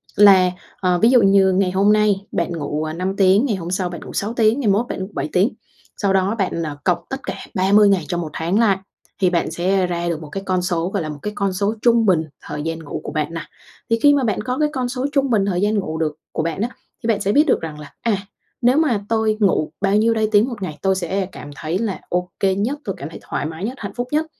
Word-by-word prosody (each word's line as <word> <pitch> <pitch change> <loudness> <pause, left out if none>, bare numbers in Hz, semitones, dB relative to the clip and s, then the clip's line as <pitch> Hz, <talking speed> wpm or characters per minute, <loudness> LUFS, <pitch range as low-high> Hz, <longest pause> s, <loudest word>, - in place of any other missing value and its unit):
là, 190 -3 +7 0.3
ờ, 180 -2 +1
ví 225 - +5
dụ 250 -3 +6
như 195 -1 +5
ngày 185 -1 +2
hôm 200 +3 +4
nay 210 -2 +2
bạn 170 +1 -1
ngủ, 150 -2 -3
ờ, 155 0 -3
5 185 +3 -2
tiếng, 195 +5 +4
ngày 220 -7 0
hôm 175 -1 -5
sau 185 -1 -1
bạn 175 -2 -7
ngủ - - -9
6 210 +3 -2
tiếng, 230 +2 +3
ngày 245 - -1
mốt 225 +5 +1
bạn 190 0 -4
7 - - -3
tiếng. 190 +6 +4 0.5
Sau 200 -2 +1
đó 195 +3 +2
bạn, 180 -4 -1
ờ, 150 -2 -5
cộng 180 -2 +2
tất 270 - -4
cả - - -4 0.2
30 200 +1 +5
ngày 190 -4 +2
trong 175 -1 -2
một 160 - -5
tháng 175 +7 0
lại, 205 -5 +4 0.4
thì 185 - +4
bạn 170 -2 0
sẽ 185 +3 +1
ra 175 0 -2
được 165 -1 -3
một 155 - -9
cái 195 +5 -5
con 185 -1 +1
số, 175 -1 -1
gọi 195 -3 -2
là, 155 - -4
một 145 -1 -7
cái 210 - -4
con 200 -2 0
số 200 +3 0
trung 235 -2 +4
bình 170 -5 +3 0.2
thời 150 0 -6
gian 165 +1 -3
ngủ 160 -3 -6
của - - -5
bạn 155 +1 -2
nà. 165 - -6 0.4
Thì 230 0 +2
khi 290 0 +7
mà 280 -2 +2
bạn 210 -4 0
có 250 +3 -3
cái 300 -1 +2
con 250 -2 -1
số 255 +1 -2
trung 275 -2 +1
bình 210 -5 +2
thời 185 -2 0
gian 210 +1 +2
ngủ 160 -4 -4
được 155 -2 -1 0.2
của 160 - -2
bạn 165 +4 -2
á, 235 - 0 0.3
thì 225 - -2
bạn 215 -2 +1
sẽ 200 0 +1
biết 295 +5 +5
được - - +2
rằng 155 -2 -6
là, 150 -2 -11
à, 225 -4 +1 0.4
nếu 250 +3 +4
mà 270 -10 +2
tôi 220 -1 +1
ngủ 185 -7 +2
bao 200 0 +2
nhiêu 225 +2 +3
đây 220 -1 +1
tiếng 215 +5 +4
một 225 -5 -7
ngày 155 -5 -4
tôi 190 -1 +2
sẽ 190 +2 -1
cảm 145 - -9
thấy 160 +4 -2
là 205 -2 -2
ô 180 0 -1
kê 190 -1 +2
nhất, 240 +9 -1
tôi 195 -5 -4
cảm 145 +3 -6
thấy - - -10
thoải - - -3
mái 160 +4 -5
nhất, 245 - -3
hạnh 200 - -6
phúc 245 0 -3
nhất. 310 +1 +1
195 Hz, 280 wpm, -20 LUFS, 175-220 Hz, 0.5 s, là